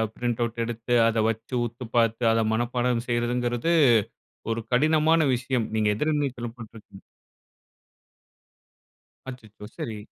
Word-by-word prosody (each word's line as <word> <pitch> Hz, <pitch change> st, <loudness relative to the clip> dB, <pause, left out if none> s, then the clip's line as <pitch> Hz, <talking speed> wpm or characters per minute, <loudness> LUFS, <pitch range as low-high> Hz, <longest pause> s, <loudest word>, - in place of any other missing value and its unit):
Print 120 Hz, -1 st, -2 dB
out 115 Hz, 0 st, -3 dB
எடுத்து 120 Hz, +1 st, -2 dB
அத 115 Hz, -1 st, +1 dB
வச்சு, 115 Hz, +3 st, -5 dB
உத்து 120 Hz, +2 st, -7 dB
பார்த்து, 115 Hz, 0 st, +2 dB
அத 115 Hz, 0 st, +2 dB
மனப்பாடம் 120 Hz, +1 st, -1 dB
செய்யிறதுங்கிறது 120 Hz, +5 st, 0 dB, 0.8 s
ஒரு 115 Hz, -, -2 dB
கடினமான 155 Hz, +4 st, +3 dB, 0.2 s
விஷயம். 120 Hz, -2 st, -2 dB
நீங்க 105 Hz, -1 st, +2 dB
எதிர்நீச்சல் 135 Hz, -4 st, -2 dB
போட்டுருக்கீங்க. 110 Hz, -4 st, -13 dB, 2.3 s
அச்சச்சோ! 110 Hz, -4 st, -11 dB
சரி. 125 Hz, -10 st, -5 dB
120 Hz, 105 wpm, -25 LUFS, 115-125 Hz, 2.3 s, கடினமான